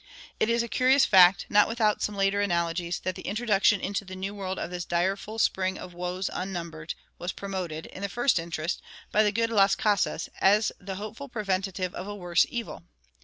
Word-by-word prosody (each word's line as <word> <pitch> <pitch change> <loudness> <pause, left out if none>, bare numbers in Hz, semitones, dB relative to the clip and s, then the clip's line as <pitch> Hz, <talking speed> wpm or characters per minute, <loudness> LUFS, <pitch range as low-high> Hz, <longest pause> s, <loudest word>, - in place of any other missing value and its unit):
It 220 - +2
is 235 0 +2
a - - -4
curious 260 +4 +4
fact, 185 -1 +6
not 210 0 +5
without 220 -2 +1
some 210 - -1
later 195 +1 +2
analogies, 170 -2 0
that 185 - -2
the - - -9
introduction 205 -1 +2
into 200 +2 -2
the 185 -1 -9
New 190 +2 -4
World 190 -2 -4
of 175 - -4
this 180 0 -3
"direful 190 +6 -1
spring 190 -3 +1
of 180 - -9
woes 180 +2 -3
unnumbered" 170 -4 -5 0.2
was 175 +1 -3
promoted, 180 -6 -5
in - - -10
the 200 - -2
first 240 0 +2
instance, 165 0 -3 0.3
by 215 - +4
the 210 -1 +3
good 230 +2 0
Las 195 -3 +4
Casas, 205 -3 0
as 210 +3 +4
the 190 0 -6
hopeful 215 +8 -7
preventive 195 -4 -2
of 185 - -6
a 205 - -5
worse 175 -3 +2
evil. 235 -2 -5
195 Hz, 195 wpm, -27 LUFS, 180-210 Hz, 0.3 s, fact